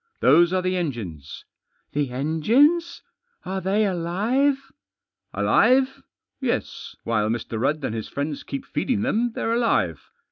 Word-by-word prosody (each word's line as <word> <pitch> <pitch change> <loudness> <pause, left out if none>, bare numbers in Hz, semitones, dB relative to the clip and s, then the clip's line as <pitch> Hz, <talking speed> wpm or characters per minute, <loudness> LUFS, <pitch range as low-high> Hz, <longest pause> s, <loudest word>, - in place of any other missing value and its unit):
" 455 - -47
Those 170 +2 +5
are 185 -1 0
the 185 0 0
engines." 105 - -5 0.2
" - - -45
The 145 -2 0
engines? 230 - +2 0.4
Are 190 +1 -3
they 200 +4 +1
alive? 215 +11 0
" - - -66
" - - -59
Alive? 260 +1 +3 0.4
Yes, - - -3
while 110 -2 0
Mr. 115 -1 -3
Rudd 145 +3 0
and - - -2
his 110 -1 -4
friends 145 +1 -3
keep 275 -1 -6
feeding 240 -7 -1
them 240 -1 0
they're 225 - -1
alive. 235 -1 0
185 Hz, 150 wpm, -24 LUFS, -, 0.4 s, Those